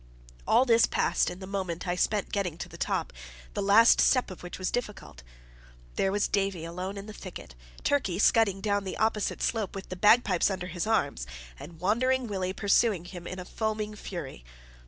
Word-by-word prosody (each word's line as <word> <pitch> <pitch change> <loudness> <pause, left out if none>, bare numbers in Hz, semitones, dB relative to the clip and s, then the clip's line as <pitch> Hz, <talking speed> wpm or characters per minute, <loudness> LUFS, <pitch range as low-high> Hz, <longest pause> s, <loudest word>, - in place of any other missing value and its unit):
All 260 - +5
this 230 -2 +5
passed - - +1
in 180 - -7
the 190 - -8
moment 185 -3 -4
I 175 - +1
spent 205 +2 +1
in - - -21
getting 180 -6 -2
to - - -6
the - - -13
top, - - -2 0.4
the - - -2
last 205 +4 +6
step 255 -6 +3
of 185 - -10
which 175 - -7
was 185 -1 -2
difficult. 210 - -5 0.7
There 195 - +1
was 205 +1 +1
Davie 195 -4 -1
alone 180 +4 -5
in 200 - -7
the 215 - -9
thicket, 180 - -9 0.3
Turkey 250 -12 +1
scudding 200 -2 +3
down 205 -1 0
the 190 - -5
opposite 220 -1 0
slope 220 -5 -1
with 195 - -7
the 185 - -4
bagpipes 210 -1 +4
under 190 -2 -3
his 180 +2 -4
arm, 220 -11 +1 0.4
and 165 -2 -11
Wandering 250 +7 +1
Willie 190 -4 -2
pursuing 200 -2 +2
him 175 -1 -9
in 185 - -6
a 180 - -7
foaming 215 +1 -3
fury. 170 - -7
195 Hz, 195 wpm, -28 LUFS, 180-215 Hz, 0.7 s, last